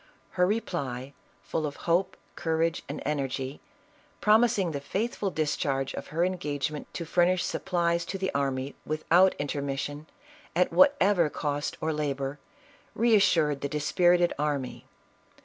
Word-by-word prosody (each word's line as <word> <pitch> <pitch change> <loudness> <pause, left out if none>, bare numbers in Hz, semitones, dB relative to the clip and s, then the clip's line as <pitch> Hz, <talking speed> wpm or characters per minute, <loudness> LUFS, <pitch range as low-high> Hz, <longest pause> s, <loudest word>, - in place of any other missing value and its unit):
Her 180 -1 +2
reply, 140 - -3 0.3
full 155 -1 -2
of 145 - -7
hope, 175 +3 +1 0.2
courage 165 +1 0
and 145 - -5
energy, 135 -2 -2 0.6
promising 215 -4 +3
the 140 -2 -4
faithful 205 +6 -2
discharge 140 -4 -1
of - - -6
her 165 +3 +1
engage 150 -6 -2
ment 150 - -8
to 170 - -3
furnish 175 +2 +2
supplies 170 -2 0
to 195 - -4
the 190 0 -2
army 135 -1 -1
without 170 +5 +3
intermis 140 -1 -2
sion, 145 +2 -6 0.5
at 180 +1 +2
whatever 205 - +5
cost 145 0 -3
or 160 0 0
labor, 140 -2 -2 0.6
reassured 195 -10 +3
the 140 - -2
dispirited 175 +4 +3
army. 145 -4 -2
155 Hz, 130 wpm, -28 LUFS, 145-180 Hz, 0.6 s, whatever